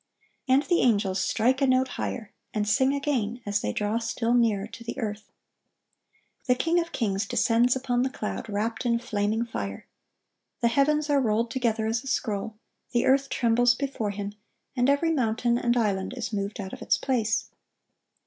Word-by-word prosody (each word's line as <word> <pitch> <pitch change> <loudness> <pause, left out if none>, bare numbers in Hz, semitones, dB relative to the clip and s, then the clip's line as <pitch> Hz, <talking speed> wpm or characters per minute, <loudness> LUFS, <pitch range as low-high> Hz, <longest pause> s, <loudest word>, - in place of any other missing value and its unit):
And 265 +2 +4
the 350 0 +2
angels 200 -5 +2
strike 255 +7 +1
a 275 - +4
note 260 0 +3
higher, 220 -4 -5 0.2
and 210 -1 0
sing 260 +6 +3
again, 260 -5 -1
as 205 0 0
they - - -1
draw 210 +2 -1
still 230 +1 -1
nearer 225 -5 +2
to 230 +1 -11
the 235 - -6
earth. 210 -2 -4 1.2
The 250 - +4
King 330 +6 +2
of 335 0 -3
kings 200 -3 -1
descends 240 +4 +3
upon 250 -2 0
the 260 - +1
cloud, 225 -3 -5
wrapped 220 +3 -2
in 235 -2 +2
flaming 220 -1 -1
fire. 100 - -5 0.8
The 235 - +4
heavens 290 +4 +2
are 280 -1 +4
rolled 230 0 +1
together 230 -3 0
as 225 +3 -1
a - - -9
scroll, 220 -4 -2 0.4
the 240 - +2
earth 275 +1 +3
trembles 245 +1 +3
before 265 -6 -2
Him, 200 0 -5 0.4
and 250 +1 +2
every 285 +4 +2
mountain 240 -3 +1
and 240 0 +1
island 205 0 0
is 235 -2 -4
moved 200 +1 -3
out 190 -1 -6
of - - -8
its - - +2
place. 235 -4 0
235 Hz, 175 wpm, -26 LUFS, 210-260 Hz, 1.2 s, And